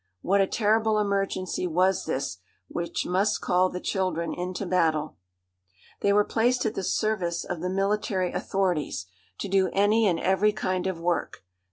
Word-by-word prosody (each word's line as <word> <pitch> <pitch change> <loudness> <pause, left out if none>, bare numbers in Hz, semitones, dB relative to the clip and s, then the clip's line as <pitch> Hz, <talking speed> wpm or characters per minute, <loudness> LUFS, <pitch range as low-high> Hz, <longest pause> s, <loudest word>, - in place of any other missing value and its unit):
What 195 +2 +3
a 195 - +3
terrible 220 +1 +2
emergency 195 -3 -1
was 185 +3 +2
this, 95 -9 -3 0.3
which 170 0 -3
must 195 +4 +1
call 180 +1 +2
the 180 - -5
children 185 -3 -1
into 180 +2 -4
battle! 160 -4 +1 0.8
They 200 - +2
were 205 +1 +5
placed 245 +4 +1
at 220 - 0
the - - -3
service 185 -4 0
of 175 -2 -4
the 180 - -1
military 195 -1 0
authorities, 175 - -1 0.3
to - - -4
do 190 -1 +2
any 210 +2 +3
and 170 -3 +1
every 190 +3 +2
kind 185 -3 -1
of 185 -3 -3
work. 170 - -2
190 Hz, 160 wpm, -26 LUFS, 175-205 Hz, 0.8 s, were